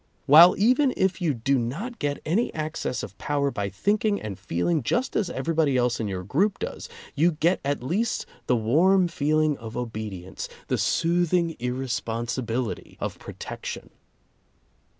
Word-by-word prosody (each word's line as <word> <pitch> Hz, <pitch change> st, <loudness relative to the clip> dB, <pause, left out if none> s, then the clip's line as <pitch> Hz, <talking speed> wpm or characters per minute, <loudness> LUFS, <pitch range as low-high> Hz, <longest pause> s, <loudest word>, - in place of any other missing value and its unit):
While 165 Hz, +5 st, +9 dB
even 255 Hz, +6 st, +3 dB
if 190 Hz, 0 st, +1 dB
you 170 Hz, -3 st, +2 dB
do 135 Hz, +3 st, +1 dB
not 185 Hz, -, -4 dB
get 145 Hz, 0 st, -2 dB
any 195 Hz, +10 st, +1 dB
access 155 Hz, -4 st, -3 dB
of 100 Hz, -, -8 dB
power 140 Hz, -1 st, 0 dB
by 100 Hz, -4 st, -2 dB
thinking 205 Hz, -, +1 dB
and 100 Hz, -3 st, -6 dB
feeling 95 Hz, -, 0 dB
just 240 Hz, -, -1 dB
as 205 Hz, -, +1 dB
everybody 160 Hz, -5 st, +1 dB
else 125 Hz, -1 st, +1 dB
in 110 Hz, -, -1 dB
your 95 Hz, -2 st, -4 dB
group 185 Hz, -, +1 dB
does, -, -, -6 dB, 0.2 s
you 165 Hz, +4 st, +3 dB
get 165 Hz, +4 st, +2 dB
at 140 Hz, -2 st, -1 dB
least 205 Hz, -, -1 dB, 0.2 s
the 125 Hz, -, +3 dB
warm 170 Hz, -, +3 dB
feeling 155 Hz, -2 st, +1 dB
of 115 Hz, -1 st, -7 dB
obedience, 110 Hz, -6 st, -5 dB, 0.2 s
the -, -, +1 dB
soothing 170 Hz, 0 st, +1 dB
irresponsibility 120 Hz, -1 st, -3 dB
of -, -, -4 dB
protection. -, -, -7 dB
145 Hz, 150 wpm, -25 LUFS, 120-175 Hz, 0.2 s, While